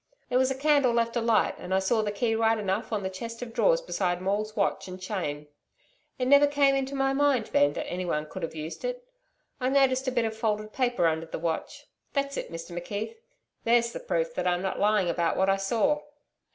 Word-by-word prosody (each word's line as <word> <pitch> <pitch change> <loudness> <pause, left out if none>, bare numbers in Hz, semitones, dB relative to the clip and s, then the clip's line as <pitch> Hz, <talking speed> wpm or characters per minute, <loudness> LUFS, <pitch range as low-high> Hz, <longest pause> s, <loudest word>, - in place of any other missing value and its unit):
There 250 0 +3
was 260 0 +3
a 265 - -2
candle 285 -3 +3
left 230 0 +1
alight, 230 -2 +2
and 190 - -2
I - - +4
saw 205 +4 +2
the 210 -1 -1
key 225 +2 0
right 225 0 +2
enough 195 0 -2
on 210 -3 -1
the 190 - -1
chest 230 +5 -6
of 230 -2 -8
drawers - - +3
beside 180 - -1
Maule's 205 +3 -2
watch 200 -2 0
and 185 0 -8
chain. 160 -7 -4 0.7
It 255 - -1
never 285 +2 +7
came 285 -1 +3
into 270 0 -1
my 270 0 +1
mind 275 -5 +2
then, 145 0 +4
that - - -4
anybody 175 -4 -2
could 185 +5 -8
have 165 - -4
used 155 +1 -6
it. - - -4 0.5
I 255 0 0
noticed 265 -1 +3
a - - +2
bit 240 -2 +1
of 220 0 -3
folded 215 -1 -2
paper 245 -8 +1
under 160 0 0
the - - -5
watch. 165 0 -4 0.3
That's 280 -1 -1
it, - - -5
Mr 165 +1 -7
McKeith. 205 - -5 0.5
There's 235 0 +3
the - - -5
proof - - -1
that - - -2
I 180 - +3
am 175 - -4
not 190 - -2
lying 205 -2 +3
about 170 0 0
what 190 +1 +3
I 195 - +2
saw.' 235 +10 +1
225 Hz, 225 wpm, -27 LUFS, 190-265 Hz, 0.7 s, never